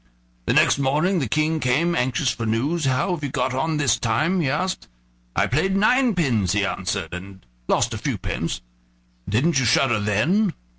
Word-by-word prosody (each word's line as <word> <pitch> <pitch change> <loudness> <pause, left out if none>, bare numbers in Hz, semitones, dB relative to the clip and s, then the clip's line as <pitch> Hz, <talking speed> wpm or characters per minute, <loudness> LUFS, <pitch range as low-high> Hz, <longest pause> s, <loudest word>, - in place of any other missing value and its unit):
The - - +2
next - - +4
morning 155 +8 +1
the 135 - -1
King 155 +3 +1
came, 150 +7 +1
anxious 125 -1 0
for 115 - -4
news. 140 +9 0
"How 135 +7 +1
have 160 -4 -5
you 140 - -2
got 130 - -1
on 150 +4 -1
this 145 -4 +1
time?" 155 +11 0
he 140 - 0
asked. 185 +7 -2 0.5
"I - - +3
played 190 +9 0
ninepins," 180 - +2
he 100 -1 +1
answered, - - -3
"and 95 -1 -9 0.2
lost - - +1
a - - -5
few - - -2
pence." - - -4 0.7
"Didn't 135 - +2
you 130 - 0
shudder 120 -1 +3
then?" 160 - +1
140 Hz, 180 wpm, -22 LUFS, 120-170 Hz, 0.7 s, next